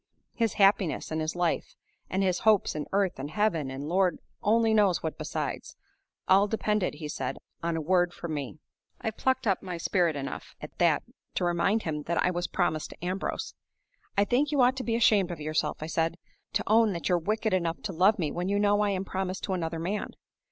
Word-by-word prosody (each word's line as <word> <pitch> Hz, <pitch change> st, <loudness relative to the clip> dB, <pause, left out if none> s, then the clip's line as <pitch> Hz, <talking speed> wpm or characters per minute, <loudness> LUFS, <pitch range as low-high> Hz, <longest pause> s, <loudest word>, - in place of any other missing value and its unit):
His 230 Hz, -3 st, 0 dB
happiness 195 Hz, -6 st, +2 dB
and 160 Hz, 0 st, -1 dB
his 155 Hz, +2 st, -2 dB
life, 175 Hz, -2 st, -1 dB, 0.3 s
and 190 Hz, +1 st, 0 dB
his 185 Hz, -2 st, +1 dB
hopes 215 Hz, -3 st, +3 dB
in 150 Hz, -1 st, -4 dB
earth 195 Hz, -6 st, +1 dB
and 140 Hz, +2 st, -4 dB
heaven, 165 Hz, -6 st, 0 dB
and 135 Hz, +2 st, -5 dB
Lord 185 Hz, +2 st, +2 dB, 0.2 s
only 225 Hz, +1 st, +3 dB
knows 205 Hz, -5 st, +3 dB
what 160 Hz, -, -2 dB
besides, -, -, -4 dB, 0.5 s
all 195 Hz, +2 st, +5 dB
depended, 210 Hz, -4 st, 0 dB
he 150 Hz, 0 st, -6 dB
said, 135 Hz, -3 st, -3 dB, 0.2 s
on 170 Hz, -1 st, -1 dB
a -, -, -1 dB
word 175 Hz, +2 st, +2 dB
from 170 Hz, -2 st, -6 dB
me. 145 Hz, -2 st, -4 dB, 0.4 s
I 220 Hz, -, -2 dB
plucked 260 Hz, +3 st, 0 dB
up 195 Hz, -4 st, +2 dB, 0.2 s
spirit 170 Hz, -2 st, +1 dB
enough 140 Hz, -1 st, -6 dB
at -, -, -9 dB
that -, -, +3 dB, 0.3 s
to -, -, +1 dB
remind 175 Hz, +6 st, +1 dB
him 150 Hz, -2 st, -2 dB
that 170 Hz, 0 st, 0 dB
I 180 Hz, -, +2 dB
was 175 Hz, 0 st, -2 dB
promised 155 Hz, -4 st, -1 dB
to 175 Hz, -, -9 dB
Ambrose. 190 Hz, -, -3 dB, 0.6 s
'I 200 Hz, -, +5 dB
think 275 Hz, +7 st, +1 dB
you 285 Hz, -3 st, +3 dB
ought 250 Hz, +1 st, +4 dB
to 260 Hz, -, -3 dB
be 230 Hz, -2 st, 0 dB
ashamed 210 Hz, -5 st, +4 dB
of 170 Hz, -3 st, -5 dB
yourself,' 155 Hz, 0 st, -1 dB
I -, -, -3 dB
said, 165 Hz, +1 st, 0 dB, 0.4 s
'to -, -, +1 dB
own 220 Hz, -1 st, +4 dB
that 170 Hz, -4 st, -3 dB
you're 175 Hz, -1 st, +3 dB
wicked 215 Hz, +4 st, -1 dB
enough 170 Hz, -2 st, 0 dB
to 195 Hz, -, -3 dB
love 190 Hz, +6 st, +4 dB
me 160 Hz, -6 st, -1 dB
when 180 Hz, +2 st, -2 dB
you 200 Hz, -, +1 dB
know 205 Hz, 0 st, +3 dB
I 205 Hz, -, +2 dB
am 195 Hz, -1 st, -1 dB
promised 190 Hz, 0 st, -3 dB
to 190 Hz, -, -1 dB
another 165 Hz, -2 st, -2 dB
man! 185 Hz, +6 st, -3 dB
185 Hz, 210 wpm, -28 LUFS, 165-210 Hz, 0.6 s, all